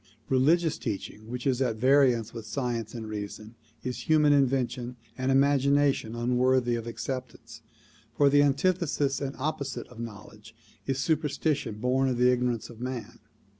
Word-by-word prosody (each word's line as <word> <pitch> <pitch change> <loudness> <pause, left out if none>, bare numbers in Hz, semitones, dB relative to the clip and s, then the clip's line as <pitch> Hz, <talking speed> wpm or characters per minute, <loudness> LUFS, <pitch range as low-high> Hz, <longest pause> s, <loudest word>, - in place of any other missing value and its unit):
Religious 155 +5 +3
teaching 110 0 -5
which 125 0 -5
is 135 -1 +1
at 120 -4 +1
variance 130 -2 +3
with 115 -2 -8
science 120 -2 -3
and 110 -2 -6
reason 110 +1 -6 0.3
is 125 +4 -5
human 150 -2 +5
invention 125 -3 0 0.2
and 130 +1 -1
imagination 140 -3 +3
unworthy 125 +1 +2
of 115 0 -3
acceptance, 115 0 -6 0.6
for 145 - +5
the 145 +1 +5
an 140 -1 +3
tithesis 145 -5 0
and 140 -1 -3
opposite 140 -1 -3
of 120 - -13
knowledge 110 0 -10 0.3
is 135 -1 0
superstition 150 -4 0
born 130 +3 +1
of 125 - -1
the 125 +1 +4
ignor 125 0 0
ance 115 - -9
of 120 -1 -13
man. 125 -2 -5
130 Hz, 155 wpm, -28 LUFS, 115-140 Hz, 0.6 s, human